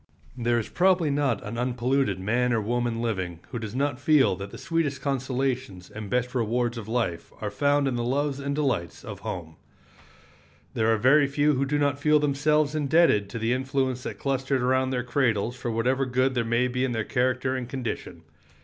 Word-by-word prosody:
There 120 Hz, -1 st, +1 dB
is 115 Hz, -, -2 dB
probably 180 Hz, -4 st, +2 dB
not 140 Hz, -6 st, 0 dB
an 115 Hz, +3 st, -5 dB
unpolluted 125 Hz, -3 st, 0 dB
man 120 Hz, +5 st, +1 dB
or 115 Hz, -, +2 dB
woman 120 Hz, +1 st, -1 dB
living 95 Hz, -7 st, -2 dB
who 120 Hz, -, -3 dB
does 110 Hz, 0 st, -6 dB
not 140 Hz, -1 st, 0 dB
feel 145 Hz, -, +4 dB
that 100 Hz, +1 st, -6 dB
the -, -, -10 dB
sweetest 165 Hz, -4 st, -1 dB
consolations 130 Hz, -7 st, -2 dB
and 105 Hz, -1 st, -7 dB
best 125 Hz, +2 st, 0 dB
rewards 120 Hz, 0 st, 0 dB
of 115 Hz, -3 st, -7 dB
life 115 Hz, -7 st, -2 dB
are -, -, -3 dB
found 145 Hz, 0 st, +2 dB
in 125 Hz, -3 st, -1 dB
the 120 Hz, -, -1 dB
loves 140 Hz, +3 st, 0 dB
and 140 Hz, 0 st, -2 dB
delights 135 Hz, -, -1 dB
of -, -, -7 dB
home. 80 Hz, -3 st, -6 dB, 1.2 s
There 115 Hz, -1 st, +2 dB
are 110 Hz, -, +3 dB
very 140 Hz, +6 st, +5 dB
few 145 Hz, +2 st, +2 dB
who 135 Hz, 0 st, +1 dB
do 145 Hz, +1 st, 0 dB
not 145 Hz, -1 st, +1 dB
feel 150 Hz, +1 st, +4 dB
themselves 150 Hz, +1 st, +2 dB
indebted 145 Hz, -8 st, +3 dB
to 115 Hz, -, -5 dB
the 115 Hz, +2 st, 0 dB
influence 130 Hz, -1 st, -1 dB
that -, -, -6 dB
clustered 135 Hz, -1 st, -1 dB
around 130 Hz, +1 st, +2 dB
their 125 Hz, -2 st, -1 dB
cradles 120 Hz, -3 st, 0 dB
for 125 Hz, -1 st, -4 dB
whatever 130 Hz, +4 st, +1 dB
good 130 Hz, +1 st, +1 dB
there 120 Hz, -2 st, 0 dB
may 115 Hz, +2 st, +1 dB
be 125 Hz, +1 st, -1 dB
in 130 Hz, -2 st, 0 dB
their 110 Hz, -2 st, -1 dB
character 130 Hz, +1 st, 0 dB
and 125 Hz, -2 st, -4 dB
condition. 115 Hz, -10 st, -5 dB
125 Hz, 195 wpm, -26 LUFS, 115-140 Hz, 1.2 s, very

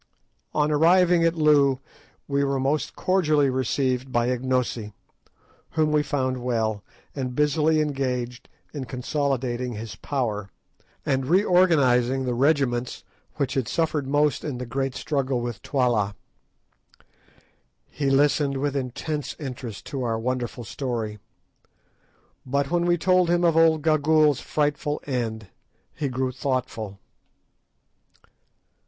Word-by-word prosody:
On 150 Hz, 0 st, +2 dB
arriving 170 Hz, +3 st, +4 dB
at 165 Hz, 0 st, +2 dB
Loo 145 Hz, -4 st, +4 dB, 0.5 s
we 140 Hz, 0 st, +1 dB
were 140 Hz, -1 st, 0 dB
most 140 Hz, +3 st, -1 dB
cordially 155 Hz, -7 st, +2 dB
received 130 Hz, 0 st, -1 dB
by 120 Hz, 0 st, +1 dB
Ignosi, 125 Hz, -4 st, -1 dB, 0.8 s
whom 155 Hz, -1 st, +2 dB
we 150 Hz, 0 st, +3 dB
found 130 Hz, -3 st, -1 dB
well, 110 Hz, -4 st, -1 dB, 0.3 s
and 130 Hz, -3 st, -3 dB
busily 150 Hz, +2 st, +2 dB
engaged 125 Hz, -4 st, -3 dB, 0.2 s
in 140 Hz, -4 st, -4 dB
consolidating 125 Hz, -1 st, -2 dB
his 110 Hz, -3 st, -7 dB
power, 110 Hz, -6 st, -3 dB, 0.6 s
and 130 Hz, -1 st, 0 dB
reorganising 145 Hz, -, +3 dB
the 125 Hz, -, -1 dB
regiments 125 Hz, -2 st, +1 dB, 0.3 s
which 135 Hz, -2 st, -1 dB
had 130 Hz, -4 st, -1 dB
suffered 155 Hz, -1 st, -1 dB
most 145 Hz, +1 st, +1 dB
in 145 Hz, -5 st, -4 dB
the 125 Hz, -, -5 dB
great 135 Hz, +2 st, -2 dB
struggle 135 Hz, -4 st, -1 dB
with 120 Hz, -4 st, -5 dB
Twala. 120 Hz, -7 st, 0 dB, 1.7 s
He 140 Hz, -1 st, -2 dB
listened 140 Hz, 0 st, +2 dB
with 145 Hz, +1 st, -1 dB
intense 140 Hz, +3 st, -3 dB
interest 125 Hz, -7 st, -7 dB
to 135 Hz, -, -4 dB
our 115 Hz, -2 st, -1 dB
wonderful 120 Hz, +1 st, -3 dB
story; 115 Hz, -3 st, -4 dB, 1.2 s
but 140 Hz, +1 st, -1 dB
when 175 Hz, 0 st, +1 dB
we 175 Hz, 0 st, +3 dB
told 180 Hz, 0 st, +3 dB
him 175 Hz, 0 st, +2 dB
of 165 Hz, -2 st, +3 dB
old 160 Hz, -2 st, +4 dB
Gagool's 155 Hz, -2 st, +3 dB
frightful 150 Hz, 0 st, -1 dB
end 115 Hz, -6 st, -3 dB, 0.4 s
he 145 Hz, -, -2 dB
grew 130 Hz, 0 st, -1 dB
thoughtful. 125 Hz, -6 st, -3 dB
135 Hz, 120 wpm, -25 LUFS, 125-150 Hz, 1.7 s, arriving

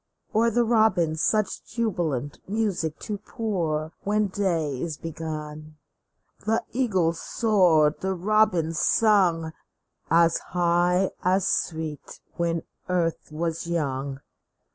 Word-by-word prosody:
Or 230 Hz, +2 st, +4 dB
the 240 Hz, +2 st, +2 dB
robin 215 Hz, -8 st, +3 dB
such 215 Hz, +6 st, 0 dB
jubilant 175 Hz, -, -2 dB
music 195 Hz, -8 st, -1 dB
to 210 Hz, -2 st, -4 dB
pour 165 Hz, -10 st, -2 dB
When 210 Hz, 0 st, +1 dB
day 165 Hz, -9 st, -1 dB
is 160 Hz, -4 st, -3 dB
begun? 155 Hz, -1 st, -7 dB, 0.6 s
The 220 Hz, +2 st, 0 dB
eagles 190 Hz, -10 st, +1 dB
soared, 175 Hz, -9 st, +3 dB
the 190 Hz, 0 st, -1 dB
robins 180 Hz, -4 st, +2 dB
sung, 180 Hz, -7 st, +3 dB, 0.6 s
As 165 Hz, 0 st, +4 dB, 0.2 s
high, 175 Hz, +2 st, +3 dB
as 185 Hz, +1 st, +2 dB
sweet, 160 Hz, -3 st, -3 dB, 0.2 s
when 170 Hz, -1 st, -1 dB, 0.3 s
earth 170 Hz, -2 st, -1 dB
was 165 Hz, +1 st, -3 dB
young 140 Hz, -4 st, -2 dB
170 Hz, 105 wpm, -25 LUFS, 160-205 Hz, 0.6 s, Or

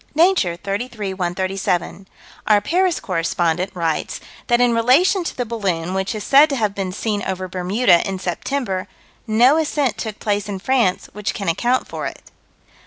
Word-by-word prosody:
Nature, 325 Hz, -, +3 dB
33 205 Hz, +2 st, -4 dB
137: 185 Hz, 0 st, -2 dB, 0.4 s
"Our 210 Hz, -1 st, +5 dB
Paris 355 Hz, -, +1 dB
correspondent 170 Hz, +2 st, -1 dB
writes 165 Hz, -3 st, -2 dB, 0.3 s
that 240 Hz, -1 st, +3 dB
in 245 Hz, -1 st, +4 dB
relation 285 Hz, -, +3 dB
to -, -, -5 dB
the 245 Hz, -, -1 dB
balloon 190 Hz, -7 st, -2 dB
which 190 Hz, +3 st, -2 dB
is 210 Hz, -, -5 dB
said 285 Hz, +6 st, +6 dB
to 280 Hz, -, -1 dB
have 215 Hz, -5 st, 0 dB
been 195 Hz, -2 st, -3 dB
seen 205 Hz, +1 st, -2 dB
over 185 Hz, -1 st, -3 dB
Bermuda, 185 Hz, +1 st, +2 dB
in 190 Hz, -, -3 dB
September, 190 Hz, -, -3 dB, 0.4 s
no 240 Hz, +7 st, +5 dB
ascent 290 Hz, -8 st, 0 dB
took 220 Hz, -2 st, -4 dB
place 205 Hz, -1 st, -2 dB
in 200 Hz, -, -3 dB
France 225 Hz, -2 st, +1 dB
which 210 Hz, 0 st, -3 dB
can 200 Hz, -, -4 dB
account 245 Hz, +10 st, +1 dB
for -, -, -4 dB
it." -, -, -9 dB
205 Hz, 165 wpm, -20 LUFS, 185-245 Hz, 0.4 s, said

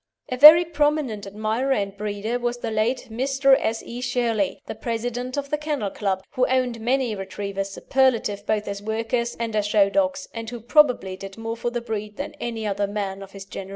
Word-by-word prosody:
A 255 Hz, -, -1 dB
very 310 Hz, +5 st, +10 dB
prominent 295 Hz, -10 st, 0 dB
admirer 220 Hz, +6 st, -1 dB
and 200 Hz, -4 st, -2 dB
breeder 210 Hz, +3 st, -3 dB
was 240 Hz, 0 st, -1 dB
the 230 Hz, -2 st, -4 dB
late 230 Hz, +4 st, -1 dB
Mr. 270 Hz, +3 st, +3 dB
S. 225 Hz, +1 st, -2 dB
E. 240 Hz, +1 st, -7 dB
Shirley, 240 Hz, -5 st, 0 dB
the -, -, -5 dB
President 245 Hz, +2 st, -3 dB
of 280 Hz, 0 st, -3 dB
the 300 Hz, -, 0 dB
Kennel 295 Hz, -10 st, -2 dB
Club, 190 Hz, -2 st, -2 dB
who 255 Hz, -, +1 dB
owned 250 Hz, -2 st, 0 dB
many 250 Hz, 0 st, +1 dB
Retrievers 195 Hz, 0 st, -4 dB
superlative 220 Hz, -3 st, 0 dB
both 215 Hz, -1 st, 0 dB
as 200 Hz, 0 st, -4 dB
workers 225 Hz, +2 st, -2 dB
and 230 Hz, -2 st, -2 dB
as 210 Hz, -1 st, +1 dB
show 205 Hz, -1 st, +4 dB
dogs, 280 Hz, +1 st, 0 dB
and 230 Hz, -1 st, -5 dB
who 240 Hz, 0 st, -6 dB
probably 240 Hz, -6 st, +3 dB
did 195 Hz, +1 st, -9 dB
more 225 Hz, 0 st, -4 dB
for 235 Hz, +1 st, -2 dB
the 240 Hz, 0 st, -3 dB
breed 215 Hz, -2 st, -5 dB
than 280 Hz, -, -5 dB
any 230 Hz, -2 st, -4 dB
other 200 Hz, 0 st, 0 dB
man 200 Hz, -1 st, -4 dB
of 195 Hz, 0 st, -11 dB
his 195 Hz, -1 st, -9 dB
generation. 195 Hz, 0 st, -8 dB
230 Hz, 200 wpm, -24 LUFS, 205-255 Hz, -, very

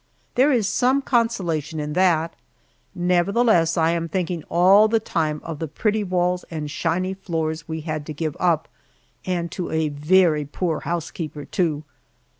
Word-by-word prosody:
There 270 Hz, +4 st, +4 dB
is 230 Hz, -7 st, +2 dB
some 260 Hz, +5 st, +2 dB
consolation 175 Hz, -, 0 dB
in 150 Hz, 0 st, -3 dB
that; 170 Hz, -2 st, +2 dB, 0.6 s
nevertheless, 180 Hz, 0 st, +2 dB
I 165 Hz, 0 st, +3 dB
am 165 Hz, -1 st, -2 dB
thinking 175 Hz, -1 st, -2 dB
all 190 Hz, +5 st, +6 dB
the 225 Hz, +1 st, +2 dB
time 155 Hz, -7 st, -1 dB
of 165 Hz, -3 st, -6 dB
the 160 Hz, -, -3 dB
pretty 215 Hz, +7 st, -1 dB
walls 180 Hz, -1 st, 0 dB
and 150 Hz, -3 st, -5 dB
shiny 180 Hz, +5 st, -1 dB
floors 165 Hz, -4 st, -3 dB
we 160 Hz, 0 st, -4 dB
had 155 Hz, -2 st, -4 dB
to 155 Hz, -, -4 dB
give 155 Hz, 0 st, -3 dB
up, 170 Hz, -3 st, +1 dB, 0.6 s
and 175 Hz, -2 st, -2 dB
to 180 Hz, -, -4 dB
a 160 Hz, -1 st, 0 dB
very 155 Hz, +1 st, +3 dB
poor 160 Hz, +2 st, -2 dB
housekeeper, 160 Hz, -3 st, -5 dB
too. 155 Hz, -3 st, -1 dB
170 Hz, 155 wpm, -22 LUFS, 155-185 Hz, 0.6 s, all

